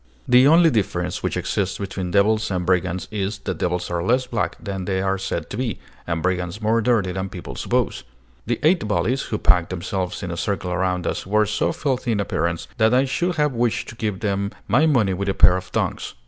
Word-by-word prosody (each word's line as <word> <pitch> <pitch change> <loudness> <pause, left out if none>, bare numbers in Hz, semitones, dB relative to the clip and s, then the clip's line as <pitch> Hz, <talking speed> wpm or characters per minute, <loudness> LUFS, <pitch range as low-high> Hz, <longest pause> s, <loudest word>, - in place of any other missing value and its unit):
The 125 +2 +6
only 165 +1 +6
difference 90 -5 -1
which - - -2
exists 95 -2 -1
between 95 -2 -4
devils 105 +3 +2
and 90 -2 -2
brigands 90 0 0
is, 100 0 -2
that 95 -5 -5
devils 90 0 -1
are 85 -1 -1
less 125 +8 +2
black 120 -3 -2
than 95 -4 -5
they 95 -1 -1
are 95 0 0
said 85 -4 -3
to 105 - -4
be, 120 -5 -2 0.3
and 85 -2 -2
brigands 90 +1 -1
more 115 +1 +2
dirty 110 -6 +2
than 95 +1 -3
people 90 -1 -8
suppose. - - -1 0.4
The 120 -1 0
eight 160 - +3
bullies, 125 +5 +1
who 105 - -3
packed 90 -4 +3
themselves 90 +2 -3
in 90 - -4
a 85 - -4
circle 90 -1 -2
around 90 -1 0
us, - - -3
were 105 +2 +3
so 105 +1 0
filthy 130 -4 -1
in 105 - -1
appearance 85 -3 -1
that 110 +2 +4
I 130 +2 +4
should 175 +6 -1
have 150 -3 +1
wished 120 -1 0
to - - -9
give 105 -4 -3
them 100 -2 -1 0.2
my 135 +10 +4
money 115 -10 +3
with 100 +2 -2
a 95 - 0
pair 90 -1 +6
of 90 -1 -6
tongs. - - -2
100 Hz, 220 wpm, -22 LUFS, 90-115 Hz, 0.4 s, The